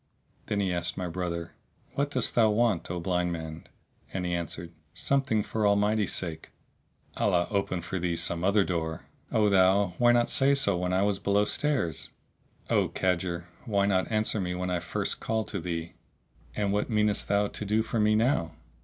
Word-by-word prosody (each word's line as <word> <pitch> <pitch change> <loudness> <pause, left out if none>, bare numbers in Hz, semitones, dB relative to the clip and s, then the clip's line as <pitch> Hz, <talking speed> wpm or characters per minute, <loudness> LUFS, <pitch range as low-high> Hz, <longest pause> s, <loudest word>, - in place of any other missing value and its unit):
Then 105 - -1
he 95 -2 0
asked 85 - -2
my 90 -1 -2
brother, 85 -1 -4 0.4
"What 140 +1 0
dost 130 -3 -1
thou 115 -2 +4
want, 105 -4 +1
O 90 0 -3
blind 90 0 0
man?" 80 -1 -6 0.4
and 95 -1 -3
he 90 - -1
answered, 85 0 -3 0.2
"Something 135 -6 +1
for 110 - -4
the 105 - +4
Almighty's 105 0 +2
sake." 85 -4 -4 0.7
"Allah 90 -4 +2
open 100 -4 -1
for 95 +1 -3
thee 85 -1 -1
some 85 0 0
other 100 +2 +4
door!" 80 -3 -3 0.3
"O 110 -1 +3
thou! 95 -1 +4
why 120 -1 +6
not 120 0 +3
say 140 +1 +3
so 115 -8 +2
when 90 0 -1
I 95 +1 +2
was 100 -1 +1
below 100 +1 +2
stairs?" 125 - 0 0.6
"O - - +2
cadger, 85 -2 -1 0.2
why 100 -4 +2
not 95 +1 +1
answer 110 -1 +1
me 90 -1 -2
when 90 0 -2
I 90 - +1
first - - -3
called 110 -1 -1
to 100 - -3
thee?" 85 -1 -4 0.6
"And 100 -1 0
what 105 +4 0
meanest 105 -2 +1
thou 100 +1 +2
to - - -6
do 105 +2 +1
for 115 - -2
me 105 0 +4
now?" 110 - +1
100 Hz, 190 wpm, -28 LUFS, 90-105 Hz, 0.7 s, why